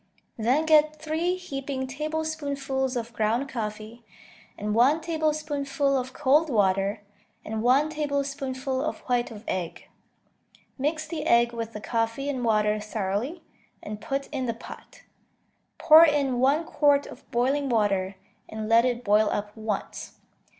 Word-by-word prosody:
Then 250 Hz, +8 st, +1 dB
get 310 Hz, -1 st, +4 dB
three 320 Hz, +4 st, -1 dB
heaping 275 Hz, -6 st, -4 dB
tablespoonfuls 280 Hz, -2 st, -3 dB
of 235 Hz, -1 st, -4 dB
ground 225 Hz, +5 st, 0 dB
coffee, 220 Hz, -1 st, -6 dB, 0.5 s
and 210 Hz, 0 st, -2 dB
one 260 Hz, +8 st, +4 dB
tablespoonful 300 Hz, -4 st, -1 dB
of 255 Hz, -1 st, -2 dB
cold 300 Hz, +4 st, +3 dB
water, 200 Hz, -2 st, +1 dB, 0.4 s
and 220 Hz, 0 st, -3 dB
one 270 Hz, +6 st, +3 dB
tablespoonful 275 Hz, -3 st, -2 dB
of -, -, -3 dB
white 245 Hz, -1 st, 0 dB
of 215 Hz, -2 st, -10 dB
egg. 175 Hz, -3 st, -4 dB, 0.9 s
Mix 310 Hz, +3 st, -2 dB
the 315 Hz, -1 st, -4 dB
egg 235 Hz, 0 st, +4 dB
with 230 Hz, -1 st, -5 dB
the 210 Hz, -, -7 dB
coffee 230 Hz, +5 st, -1 dB
and 260 Hz, -3 st, -2 dB
water 215 Hz, -2 st, +2 dB
thoroughly, 215 Hz, -, -3 dB, 0.4 s
and 210 Hz, 0 st, -7 dB
put 275 Hz, +3 st, -2 dB
in 265 Hz, -4 st, -3 dB
the 230 Hz, -, -2 dB
pot. -, -, -12 dB, 0.7 s
Pour 320 Hz, 0 st, +8 dB
in 285 Hz, -5 st, +2 dB
one 280 Hz, +6 st, +3 dB
quart 290 Hz, -3 st, +3 dB
of -, -, -13 dB
boiling 270 Hz, +4 st, +1 dB
water, 200 Hz, -4 st, +1 dB, 0.3 s
and 220 Hz, 0 st, -5 dB
let 230 Hz, +2 st, +5 dB
it 245 Hz, -1 st, -1 dB
boil 210 Hz, 0 st, +3 dB
up 205 Hz, 0 st, -3 dB
once. 215 Hz, -2 st, -4 dB
260 Hz, 140 wpm, -26 LUFS, 220-295 Hz, 0.9 s, Pour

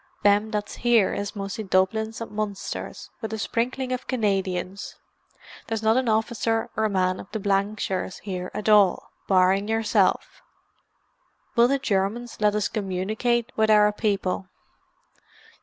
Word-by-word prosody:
Them 205 Hz, +1 st, +4 dB
that's 210 Hz, -1 st, -4 dB
here 235 Hz, -4 st, +3 dB
is 200 Hz, +1 st, -4 dB
mostly 200 Hz, +2 st, -4 dB
Dublins 220 Hz, +4 st, 0 dB
and 230 Hz, -, -6 dB
Munsters, 210 Hz, -2 st, -5 dB
with 220 Hz, -2 st, -4 dB
a -, -, -2 dB
sprinkling 250 Hz, +4 st, -2 dB
of 255 Hz, 0 st, -3 dB
Canadians. 195 Hz, -5 st, -2 dB, 0.7 s
There's 225 Hz, -1 st, -3 dB
not 220 Hz, +1 st, +4 dB
an 255 Hz, -2 st, +1 dB
officer 225 Hz, +1 st, 0 dB
or 220 Hz, 0 st, +1 dB
man 185 Hz, -2 st, 0 dB
of 195 Hz, -, -10 dB
the 220 Hz, -, -3 dB
Blankshires 195 Hz, -1 st, -1 dB
here 180 Hz, -3 st, -5 dB
at 210 Hz, -, -5 dB
all, 205 Hz, -4 st, +4 dB, 0.2 s
barring 190 Hz, +1 st, +3 dB
yourself." 225 Hz, -1 st, +1 dB, 1.1 s
"Will 235 Hz, 0 st, +6 dB
the 275 Hz, +2 st, +2 dB
Germans 225 Hz, -1 st, -2 dB
let 210 Hz, 0 st, +3 dB
us 210 Hz, -1 st, +1 dB
communicate 215 Hz, +5 st, -1 dB
with 220 Hz, 0 st, +2 dB
our 210 Hz, -1 st, +6 dB
people?" 195 Hz, -3 st, -1 dB
210 Hz, 140 wpm, -25 LUFS, 195-225 Hz, 1.1 s, Will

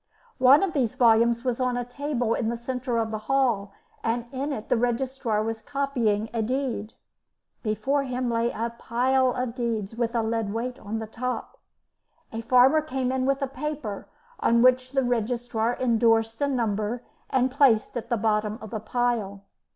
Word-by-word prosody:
One 260 Hz, +6 st, +7 dB
of 385 Hz, -, -1 dB
these 250 Hz, -7 st, 0 dB
volumes 235 Hz, 0 st, +4 dB
was 250 Hz, -1 st, 0 dB
on 250 Hz, -1 st, 0 dB
a 245 Hz, -, -2 dB
table 245 Hz, -2 st, -1 dB
in 225 Hz, -2 st, -1 dB
the 235 Hz, -, -2 dB
centre 250 Hz, 0 st, -3 dB
of 225 Hz, -1 st, 0 dB
the 215 Hz, -, -3 dB
hall, 240 Hz, -7 st, +2 dB, 0.3 s
and 235 Hz, +1 st, -1 dB
in 275 Hz, +2 st, -3 dB
it 220 Hz, -6 st, -5 dB
the -, -, +2 dB
registrar 240 Hz, -2 st, 0 dB
was 225 Hz, 0 st, -3 dB
copying 245 Hz, -7 st, 0 dB
a 230 Hz, -, 0 dB
deed. 235 Hz, -2 st, -2 dB, 0.7 s
Before 225 Hz, +6 st, 0 dB
him 255 Hz, -2 st, -2 dB
lay 235 Hz, 0 st, +1 dB
a 230 Hz, +1 st, -3 dB
pile 255 Hz, +2 st, +2 dB
of 250 Hz, -2 st, -3 dB
deeds 230 Hz, -4 st, -3 dB
with 235 Hz, 0 st, -1 dB
a 230 Hz, -, +2 dB
lead 220 Hz, -2 st, -1 dB
weight 245 Hz, +3 st, -3 dB
on 210 Hz, +2 st, -4 dB
the 220 Hz, -, -4 dB
top. 250 Hz, +3 st, -5 dB, 0.7 s
A 225 Hz, -, -3 dB
farmer 255 Hz, +6 st, +5 dB
came 265 Hz, -4 st, -2 dB
in 260 Hz, 0 st, 0 dB
with 275 Hz, +1 st, +1 dB
a -, -, 0 dB
paper, 270 Hz, -6 st, -5 dB, 0.3 s
on 235 Hz, +1 st, +3 dB
which 255 Hz, +1 st, +3 dB
the 270 Hz, -1 st, +2 dB
registrar 240 Hz, -1 st, -1 dB
endorsed 225 Hz, -1 st, +2 dB
a 285 Hz, -, +3 dB
number 230 Hz, -2 st, -1 dB, 0.3 s
and 260 Hz, 0 st, +2 dB
placed 255 Hz, -6 st, +3 dB
at 240 Hz, -, -4 dB
the 235 Hz, -, +1 dB
bottom 210 Hz, 0 st, 0 dB
of 220 Hz, -3 st, -10 dB
the 220 Hz, -, -3 dB
pile. 220 Hz, -3 st, -1 dB
240 Hz, 180 wpm, -26 LUFS, 225-255 Hz, 0.7 s, One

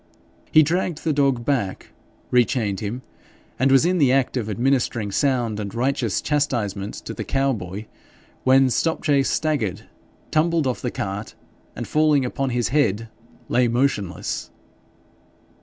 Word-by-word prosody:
He 155 Hz, -, +7 dB
dragged 170 Hz, +1 st, -1 dB
the 160 Hz, -, +1 dB
dog 135 Hz, -4 st, +1 dB
back, 120 Hz, -10 st, -2 dB, 0.4 s
rechained 115 Hz, -5 st, +2 dB
him, 115 Hz, +5 st, -4 dB, 0.6 s
and 135 Hz, +2 st, +3 dB
was 135 Hz, +4 st, +5 dB
in 180 Hz, 0 st, +2 dB
the 135 Hz, -4 st, +4 dB
act 135 Hz, -1 st, +1 dB
of 115 Hz, -4 st, -2 dB
administering 120 Hz, -2 st, 0 dB
sound 120 Hz, -3 st, 0 dB
and 100 Hz, 0 st, -5 dB
righteous 125 Hz, -3 st, 0 dB
chastisement 110 Hz, -9 st, -1 dB
to -, -, -5 dB
the -, -, -5 dB
cow 135 Hz, 0 st, +1 dB
boy, 100 Hz, 0 st, -6 dB, 0.6 s
when 130 Hz, 0 st, +5 dB
Stopchase 145 Hz, -2 st, +1 dB
staggered, 110 Hz, -, -1 dB, 0.5 s
tumbled 160 Hz, 0 st, +2 dB
off 130 Hz, -2 st, -1 dB
the 125 Hz, -, -1 dB
cart, 100 Hz, -1 st, -5 dB, 0.4 s
and -, -, -5 dB
falling 150 Hz, -3 st, +3 dB
upon 135 Hz, +2 st, -2 dB
his 120 Hz, -1 st, 0 dB
head, 115 Hz, -5 st, +1 dB, 0.4 s
lay 125 Hz, 0 st, +2 dB
motionless. 115 Hz, -6 st, -1 dB
130 Hz, 140 wpm, -22 LUFS, 110-140 Hz, 0.6 s, He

